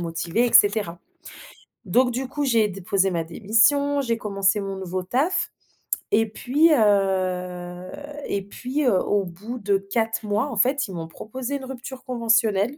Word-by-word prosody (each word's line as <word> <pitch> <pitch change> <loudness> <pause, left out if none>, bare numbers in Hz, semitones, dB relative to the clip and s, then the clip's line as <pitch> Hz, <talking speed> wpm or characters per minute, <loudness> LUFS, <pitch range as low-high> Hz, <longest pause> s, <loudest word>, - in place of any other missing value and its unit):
motivée 170 +7 0
et 240 - -3
cetera». 205 -4 +4 0.8
Donc 245 +6 +2
du 255 +1 -3
coup, 290 +2 -2
j'ai 230 -5 +3
déposé 195 0 0
ma 170 -2 -1
démission. 230 - +2
J'ai 235 -3 0
commencé 200 -1 +1
mon 195 -1 -4
nouveau 185 -1 -4
taf, 270 - 0 0.6
et 225 +1 +4
puis, 280 +9 +2
heu 185 -4 0 0.4
et 200 - -1
puis 255 +8 -3
heu, 225 -7 +4
au 205 +1 +1
bout 210 +8 -7
de 200 -1 +1
4 220 +3 -2
mois 210 +6 0
en - - -5
fait 260 +5 +2
ils 190 - -8
m'ont 165 -2 -5
proposé 250 +10 -6
une 265 - -9
rupture 265 0 -8
conventionnelle 230 -1 +1
210 Hz, 160 wpm, -23 LUFS, 190-250 Hz, 0.8 s, cetera